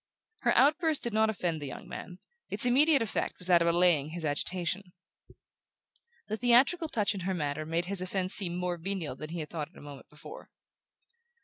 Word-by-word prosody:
Her - - +1
outburst 310 +2 +3
did 235 - -2
not 220 0 +3
offend 175 -6 -2
the 145 - -5
young 130 - -9
man; 180 -1 -8 0.3
its - - -3
immediate 280 +2 +4
effect 225 - -3
was 180 - -6
that 175 -1 +5
of 170 - +2
allaying 170 -4 +3
his 165 0 -6
agitation. 180 +5 -2 1.3
The 215 - -3
theatrical 255 +8 +3
touch 210 -5 0
in 200 - -6
her 185 +1 -2
manner 150 -1 -3
made 165 +2 -1
his 195 0 +3
offense 185 +1 0
seem 175 -4 +5
more 180 -1 -2
venial 175 -4 -4
than 155 +3 -8
he 170 0 -5
had 150 - -8
thought 155 -3 -5
it 170 - -21
a - - -12
moment 145 -2 -12
before. 150 - -12
180 Hz, 195 wpm, -29 LUFS, 165-215 Hz, 1.3 s, that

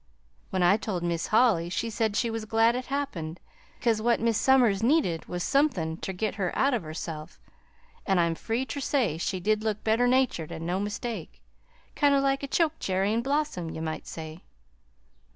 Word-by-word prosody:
When 185 -1 0
I 185 +4 +5
told 195 -5 -3
Mis' 170 -1 -1
Holly, 215 -7 +3
she 225 +6 -2
said 220 -1 0
she 230 +1 +1
was 225 -1 -4
glad 225 +2 +3
it 255 0 -4
happened, 185 - -3 0.4
'cause 225 -3 +1
what 235 +1 +2
Mis' 230 0 +1
Somers 245 -7 +4
needed 230 - +2
was 175 -1 -4
somethin' 195 - +1
ter 190 - -4
git 200 +3 -2
her 180 - 0
out 275 0 +3
of 240 - 0
herself 155 0 -7 0.7
an' 195 -2 +3
I'm 170 -1 +2
free 225 +9 -2
ter 285 - -5
say 250 - 0
she 185 +2 -2
did 215 +3 +1
look 215 -1 -2
better 225 +3 +3
natured, 250 -11 +1
an' 165 - -6
no 180 +2 -1
mistake, 210 +3 -5 0.5
kind 285 -2 +4
o' - - +4
like 275 0 +1
a 280 - -4
chokecherry 210 - 0
in 230 - +1
blossom, 275 - -1
ye 160 - -6
might 160 -1 -4
say." 160 +1 -8
215 Hz, 190 wpm, -27 LUFS, 175-250 Hz, 0.7 s, I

